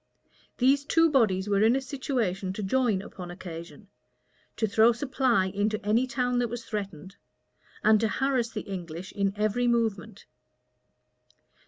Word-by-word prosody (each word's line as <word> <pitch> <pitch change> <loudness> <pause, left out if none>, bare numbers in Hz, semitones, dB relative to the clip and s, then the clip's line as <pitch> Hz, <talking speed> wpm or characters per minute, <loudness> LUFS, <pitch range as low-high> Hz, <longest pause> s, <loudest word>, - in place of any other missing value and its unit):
These 270 +3 +3
two 330 +1 +3
bodies 210 -8 +2
were 200 -1 +2
in 225 +3 +5
a - - +2
situation 240 -9 -2
to 210 - -5
join 215 -2 +1
upon 180 -4 -9
occasion; 175 +2 -9 0.7
to 220 - +1
throw 225 +2 +4
supply 250 -4 +1
into 205 +3 -1
any 230 +5 +2
town 250 -1 0
that 245 - +1
was 240 0 -6
threatened; 195 -4 -6 0.7
and 215 0 +5
to 225 - +1
harass 250 0 0
the 215 -2 -5
English 180 -1 -7
in 200 -1 0
every 215 +4 0
movement. 225 -3 -1
220 Hz, 145 wpm, -27 LUFS, 195-245 Hz, 0.7 s, in